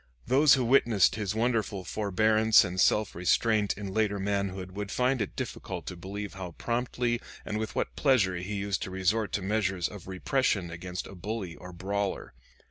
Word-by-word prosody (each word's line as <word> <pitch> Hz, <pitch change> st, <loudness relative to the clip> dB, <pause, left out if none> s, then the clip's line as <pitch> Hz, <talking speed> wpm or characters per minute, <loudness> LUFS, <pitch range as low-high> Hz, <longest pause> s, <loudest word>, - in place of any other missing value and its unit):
Those 140 Hz, +2 st, +6 dB
who 130 Hz, -2 st, 0 dB
witnessed 115 Hz, -5 st, +4 dB
his 105 Hz, -1 st, -2 dB
wonderful 110 Hz, -4 st, 0 dB
forbearance 110 Hz, +3 st, +3 dB
and 90 Hz, +1 st, -1 dB
self 105 Hz, -1 st, +3 dB
restraint 105 Hz, +4 st, +2 dB
in 100 Hz, -2 st, -5 dB
later 105 Hz, -1 st, +1 dB
manhood 95 Hz, -2 st, -2 dB
would 100 Hz, +1 st, -5 dB
find 125 Hz, 0 st, +1 dB
it 105 Hz, -, -3 dB
difficult -, -, -5 dB
to -, -, -5 dB
believe 100 Hz, +3 st, -6 dB
how 90 Hz, -2 st, -7 dB
promptly 120 Hz, +2 st, -1 dB, 0.2 s
and 105 Hz, -, -2 dB
with 110 Hz, -, -4 dB
what -, -, -2 dB
pleasure 115 Hz, -11 st, +3 dB
he 95 Hz, +4 st, -4 dB
used 100 Hz, -1 st, -2 dB
to -, -, -3 dB
resort 100 Hz, +4 st, 0 dB
to 100 Hz, -, -1 dB
measures 95 Hz, -3 st, 0 dB
of 100 Hz, -4 st, -10 dB
repression 95 Hz, -1 st, 0 dB
against 90 Hz, +2 st, -5 dB
a -, -, -10 dB
bully 95 Hz, -2 st, -5 dB
or 90 Hz, -, -10 dB
brawler. 95 Hz, 0 st, -3 dB
100 Hz, 175 wpm, -29 LUFS, 95-110 Hz, 0.2 s, Those